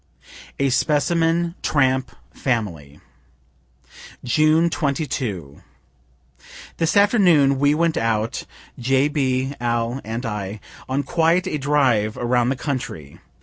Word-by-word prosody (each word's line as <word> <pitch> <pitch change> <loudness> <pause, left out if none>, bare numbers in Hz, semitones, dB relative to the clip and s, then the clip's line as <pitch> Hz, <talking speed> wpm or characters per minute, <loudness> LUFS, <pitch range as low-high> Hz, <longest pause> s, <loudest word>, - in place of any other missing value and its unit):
A 140 -1 +1
SPECIMEN 165 +5 +1
TRAMP 130 -3 +1 0.2
FAMILY 85 - -3 1.2
June 155 +6 +3
22. 125 - -3 1.2
This 165 +4 +1
afternoon 175 - +4
we 145 +1 +3
went 165 0 +1
out 115 0 -1 0.3
(J. 135 +3 +2
B., 135 -2 -1
Al. 120 +2 -1
and 115 +3 -5
I) 105 -1 -4 0.3
on 135 +2 0
quite 165 +4 +1
a 150 - -3
drive 130 -7 +1
around 120 0 +1
the 135 - 0
country. 85 - -5
135 Hz, 105 wpm, -21 LUFS, 115-155 Hz, 1.2 s, afternoon